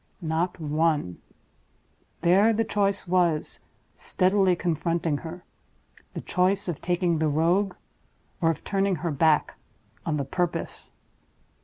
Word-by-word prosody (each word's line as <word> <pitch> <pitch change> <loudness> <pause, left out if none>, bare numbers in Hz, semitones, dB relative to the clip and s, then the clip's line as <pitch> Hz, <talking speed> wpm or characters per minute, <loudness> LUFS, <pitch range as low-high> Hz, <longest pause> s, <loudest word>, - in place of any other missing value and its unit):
Not 170 +1 -2
one! 150 - 0 1.0
There 195 +6 +4
the 225 +1 +1
choice 200 -3 0
was, 175 -3 +1 0.4
steadily 185 0 +2
confronting 170 -2 -1
her: 170 +2 -8 0.7
the - - -4
choice 190 +2 +1
of 170 -4 -4
taking 175 -2 0
the 160 - +2
Rogue, 175 +6 +1 0.7
or 165 - +3
of 165 - -2
turning 195 -1 0
her 170 - 0
back 150 +1 +2 0.5
on 155 -2 -1
the 140 - -2
Purpose. 175 +5 -3
175 Hz, 120 wpm, -26 LUFS, 160-185 Hz, 1.0 s, There